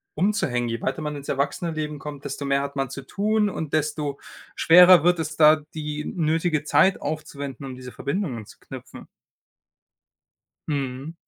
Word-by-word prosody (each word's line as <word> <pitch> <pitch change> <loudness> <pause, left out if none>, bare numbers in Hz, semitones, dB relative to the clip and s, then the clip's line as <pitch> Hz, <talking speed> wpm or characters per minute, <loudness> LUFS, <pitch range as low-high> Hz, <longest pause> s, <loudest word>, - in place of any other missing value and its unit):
umzuhängen. 145 - 0
Je 115 0 -3
weiter 135 +4 -2
man 150 -1 -3
ins 140 -1 -8
Erwachsenen-Leben 150 +1 -2
kommt, 145 -1 -8
desto 140 0 -4
mehr 140 0 +1
hat 140 0 -5
man 135 -2 -1
zu 135 0 -7
tun 210 +3 +1
und 160 -5 -5
desto 150 -2 -1 0.4
schwerer 180 0 +7
wird 175 -1 +3
es 155 -1 -4
da, 155 0 +7 0.2
die 150 -1 -4
nötige 160 -2 0
Zeit 155 +6 +3
aufzuwenden, 145 -3 -5
um 130 -1 -7
diese 125 -1 -9
Verbindungen 140 - -3
zu - - -15
knüpfen. - - -11 1.6
Mhm. 140 +1 -3
150 Hz, 155 wpm, -24 LUFS, 140-160 Hz, 1.6 s, schwerer